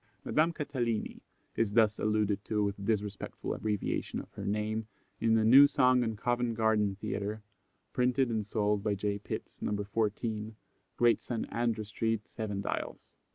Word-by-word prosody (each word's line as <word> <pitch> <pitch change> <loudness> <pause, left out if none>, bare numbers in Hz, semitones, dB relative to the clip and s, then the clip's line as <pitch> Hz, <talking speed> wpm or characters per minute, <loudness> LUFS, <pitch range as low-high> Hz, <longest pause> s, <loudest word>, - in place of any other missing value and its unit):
Madame 160 +2 +3
Catalini 130 -9 -2 0.3
is 105 -3 0
thus 110 -1 +4
alluded 105 -1 +1
to 105 -1 0
with 100 0 -2
disrespectful 105 -1 -2
abbreviation 105 -2 -2
of - - -10
her - - -7
name 105 +1 -1 0.3
in 115 0 +3
a 110 - +2
new 135 +5 +9
song 130 -2 +4
on 110 -2 -2
Covent 120 +1 0
Garden 110 -3 +2
Theatre, 105 +2 -4 0.5
printed 125 +1 +2
and 110 -3 -1
sold 105 -1 +1
by 105 -2 +1
J. 100 +1 -2
Pitts, - - -7
No. 105 0 -1
14, 110 +1 -2 0.4
Great 120 -1 +4
St. 120 -3 -3
Andrew 115 -2 0
street, 110 +1 -2
Seven 105 -3 -4
Dials. - - -4
110 Hz, 155 wpm, -31 LUFS, 105-115 Hz, 0.5 s, new